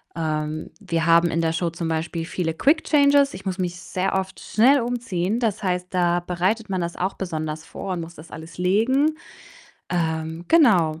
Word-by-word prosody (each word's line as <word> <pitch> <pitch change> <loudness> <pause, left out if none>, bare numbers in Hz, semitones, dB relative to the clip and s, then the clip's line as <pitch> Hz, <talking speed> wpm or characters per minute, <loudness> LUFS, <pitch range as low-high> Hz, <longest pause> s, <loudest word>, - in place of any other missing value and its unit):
Ähm, 155 -1 -3
wir 165 -4 -1
haben 170 0 +5
in 165 - 0
der 165 0 +1
Show 170 +1 0
zum 165 0 -4
Beispiel 165 +1 -2
viele 165 -1 -2
Quick 295 - +2
Changes. 285 -1 +4
Ich 190 - -9
muss 190 -1 -2
mich 180 -1 -3
sehr 185 +1 -2
oft 190 0 -7
schnell 260 +5 +4
umziehen. 230 -4 -2
Das 220 -5 -1
heißt, 180 -1 -1
da 175 -1 +2
bereitet 185 +5 -1
man 185 -2 -1
das 170 0 -4
auch 190 +2 -1
besonders 155 -3 -4
vor 190 +3 -6
und 175 - -3
muss 165 +1 -9
das 155 +2 -13
alles 160 +1 -10
legen. 235 +12 +2 0.8
Ähm, 160 -1 -2
genau. 185 - +4
180 Hz, 185 wpm, -23 LUFS, 165-205 Hz, 0.8 s, haben